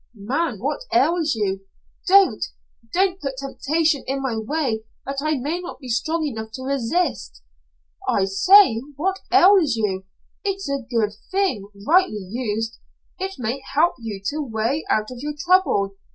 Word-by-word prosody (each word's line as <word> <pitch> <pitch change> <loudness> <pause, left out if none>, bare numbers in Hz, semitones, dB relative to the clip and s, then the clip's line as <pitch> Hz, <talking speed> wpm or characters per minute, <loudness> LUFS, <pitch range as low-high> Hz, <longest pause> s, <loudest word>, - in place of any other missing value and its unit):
"Man, 255 +11 -1
what - - -2
ails 325 -4 +2
you?" 195 -2 -2 0.4
"Don't. 390 +1 +5 0.5
Don't 375 +2 +1
put 275 -2 -4
temptation 290 +2 0
in 270 +1 -1
my 265 -4 -2
way 225 -1 -1 0.2
that 275 0 -3
I 310 0 0
may 295 +7 -2
not 360 0 -8
be 255 - -9
strong 315 +7 0
enough 220 -6 -4
to 260 - -6
resist." 260 - -1 0.7
"I 190 - +2
say, 230 - +6
what 380 +6 -1
ails 365 - +6
you? 195 -4 -1 0.4
It's 390 -3 -2
a 280 -1 -1
good 225 -4 +1 0.2
thing, 370 - 0 0.2
rightly 305 - +2
used. 225 +1 -3 0.4
It 385 +1 -3
may 245 +3 -3
help 335 +4 +4
you 220 -4 -5
to 300 - -5
a - - -1
way 235 +4 -1
out 215 +2 +1
of 250 - -8
your 295 +3 -4
trouble. 320 - +2
275 Hz, 155 wpm, -22 LUFS, 220-335 Hz, 0.7 s, say